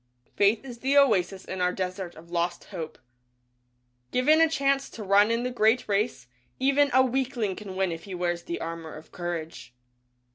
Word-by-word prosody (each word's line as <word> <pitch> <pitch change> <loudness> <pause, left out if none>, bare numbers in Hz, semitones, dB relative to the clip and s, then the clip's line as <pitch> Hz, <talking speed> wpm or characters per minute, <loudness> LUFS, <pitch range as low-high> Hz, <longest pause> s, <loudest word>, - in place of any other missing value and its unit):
Faith 210 +5 +3
is 245 -3 -9
the 270 +3 +2
oasis 195 -8 +3
in 185 -1 -5
our 180 0 +2
Desert 185 -1 -4
of 170 +2 -15
Lost 175 0 -1
Hope. 165 -4 -6 1.1
Given 305 +6 +4
a 325 - +5
chance 275 -2 +1
to 220 - -8
run 200 +2 +4
in 230 +1 0
the 250 - -2
Great 230 0 +2
Race, 200 - 0 0.3
even 275 +2 +3
a 260 +1 +5
weakling 250 -6 -1
can 195 -2 -8
win 190 -1 0
if 165 0 -7
he 195 -2 -6
wears 175 -1 -1
the 170 - -5
Armor 165 -1 -6
of 155 +1 -13
Courage. 165 -7 -6
200 Hz, 180 wpm, -27 LUFS, 175-250 Hz, 1.1 s, a